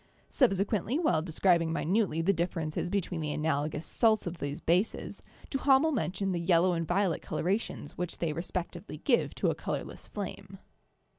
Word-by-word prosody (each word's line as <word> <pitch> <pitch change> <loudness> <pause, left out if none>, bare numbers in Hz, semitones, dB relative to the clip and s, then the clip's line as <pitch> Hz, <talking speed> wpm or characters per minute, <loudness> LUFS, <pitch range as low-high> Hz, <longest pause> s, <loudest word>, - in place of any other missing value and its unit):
Subsequently, 210 - +2
while 300 - +2
describing 165 0 +2
minutely 165 0 +1
the 200 +4 +3
differ 175 0 -1
ences 155 +2 -2
between 180 -3 -1
the 150 -1 -2
analogous 150 0 -1
salts 220 -2 +3
of 175 -1 -5
these 145 +1 -3
bases, 180 +6 0 0.3
Duha 270 -1 +4
mel 320 +3 +2
mentioned 195 - -1
the 175 - -1
yellow 175 +1 +3
and 165 -1 -2
violet 180 0 +1
colorations 185 -5 -2
which 180 -1 -3
they 165 -3 -1
respectively 175 +1 -5
give 240 - +1
to - - +1
a - - -1
colorless - - -5
flame. - - -6
175 Hz, 160 wpm, -30 LUFS, 165-200 Hz, 0.3 s, Duha